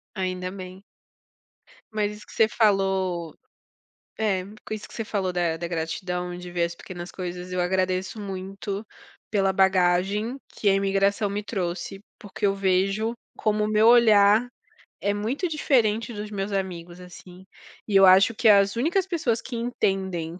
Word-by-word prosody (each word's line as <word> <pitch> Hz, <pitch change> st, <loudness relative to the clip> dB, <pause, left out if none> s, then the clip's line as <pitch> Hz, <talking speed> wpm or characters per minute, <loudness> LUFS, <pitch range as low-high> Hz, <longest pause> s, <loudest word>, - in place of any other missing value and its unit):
Ainda 185 Hz, -1 st, -3 dB
bem. 185 Hz, +1 st, -9 dB, 1.1 s
Mas 210 Hz, -1 st, 0 dB
isso 210 Hz, -, -14 dB
que -, -, -15 dB
você 220 Hz, -, +4 dB
falou, 190 Hz, -6 st, +1 dB, 0.8 s
é 195 Hz, -4 st, 0 dB, 0.2 s
com 215 Hz, -, -3 dB
isso 210 Hz, -, -8 dB
que -, -, -15 dB
você 225 Hz, -, -3 dB
falou 195 Hz, -4 st, -2 dB
da 170 Hz, -2 st, 0 dB
da 170 Hz, +1 st, -4 dB
gratidão, 180 Hz, +2 st, -3 dB
de 180 Hz, 0 st, -9 dB
ver 175 Hz, -1 st, 0 dB
as 170 Hz, 0 st, -4 dB
pequenas 175 Hz, 0 st, -9 dB
coisas, 180 Hz, 0 st, -6 dB
eu 180 Hz, -, -1 dB
agradeço 185 Hz, +3 st, -1 dB
muito 195 Hz, +1 st, -5 dB, 0.5 s
pela 195 Hz, -2 st, +2 dB
bagagem 190 Hz, +5 st, +2 dB, 0.2 s
que 205 Hz, -, 0 dB
a 195 Hz, -, +5 dB
imigração 195 Hz, +1 st, +1 dB
me 205 Hz, +1 st, -3 dB
trouxe, 190 Hz, -1 st, -4 dB, 0.2 s
porque 205 Hz, 0 st, -7 dB
eu 195 Hz, -, +2 dB
vejo, 195 Hz, +4 st, +1 dB, 0.2 s
como 215 Hz, 0 st, +1 dB
o 210 Hz, -, -1 dB
meu 215 Hz, +1 st, +3 dB
olhar 220 Hz, -1 st, +6 dB, 0.5 s
é 200 Hz, -, 0 dB
muito 225 Hz, -, -2 dB
diferente 235 Hz, -7 st, +1 dB
dos 210 Hz, 0 st, -6 dB
meus 200 Hz, 0 st, -3 dB
amigos, 180 Hz, -3 st, -4 dB
assim, 180 Hz, +1 st, -13 dB, 0.4 s
e 205 Hz, -, -3 dB
eu 195 Hz, 0 st, +8 dB
acho 190 Hz, +4 st, +6 dB
que 230 Hz, 0 st, +3 dB
as 200 Hz, 0 st, +5 dB
únicas 345 Hz, +10 st, +1 dB
pessoas 270 Hz, -11 st, -1 dB
que 255 Hz, -, -8 dB
entendem 190 Hz, -8 st, -2 dB
195 Hz, 160 wpm, -25 LUFS, 185-215 Hz, 1.1 s, eu